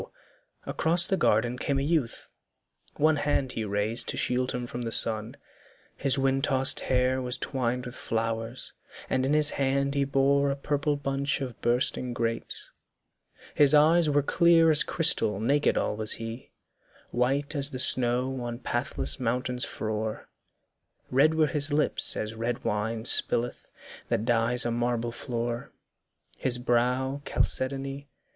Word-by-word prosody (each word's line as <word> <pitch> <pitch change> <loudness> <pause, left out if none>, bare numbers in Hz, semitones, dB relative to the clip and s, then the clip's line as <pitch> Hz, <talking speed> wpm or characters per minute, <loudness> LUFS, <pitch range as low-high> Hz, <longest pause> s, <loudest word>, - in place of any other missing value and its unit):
across 170 +2 +1
The 190 - 0
garden 120 - 0
came 140 - -1
a 135 - -1
youth; 150 -6 -2 0.7
one 155 +1 +2
hand 145 -3 -1
he 115 - -4
raised 105 +2 -2
To - - -3
shield 125 0 0
him 125 0 -4
from 120 0 -6
the 115 -1 -4
sun, 110 -1 +2 0.6
his 135 -1 +1
wind 135 0 0
tossed 135 -2 +3
hair 130 0 0
Was 125 0 -2
twined 125 -1 -3
with 125 - -8
flowers, 115 +1 -4 0.4
and 130 0 0
in 145 - 0
his 150 0 +5
hand 140 0 -1
he 140 -1 0
bore 140 +1 +1
A 140 - -1
purple 145 +1 -2
bunch 140 0 -2
of 130 -4 -7
bursting 125 +1 -1
grapes, 115 -1 -4 0.8
his 145 0 +5
eyes 160 +2 +4
Were 145 -1 +1
clear 165 +1 +3
as 150 - +4
crystal, 130 - +1
naked 140 +7 +1
all - - -1
was 110 0 +3
he, 115 +2 -8 0.6
White 135 +4 -1
as 140 -1 +3
the 130 - -7
snow 125 +1 +3
on 120 -1 -5
pathless 120 - -1
mountains 125 +1 -1
frore, 110 0 -5 0.8
Red 145 +5 +3
were 160 -1 +3
his 150 0 +2
lips 150 +1 +4
as 110 +1 -4
red 115 +1 -4
wine 110 +1 -3
spilith 120 -1 +2 0.4
that 110 - -2
dyes 120 +1 +2
A 120 - -1
marble 120 0 -2
floor, 120 0 -5 0.7
his 125 -1 +1
brow 125 +3 -1
chalcedony. 135 +1 -2
130 Hz, 150 wpm, -26 LUFS, 120-140 Hz, 0.8 s, his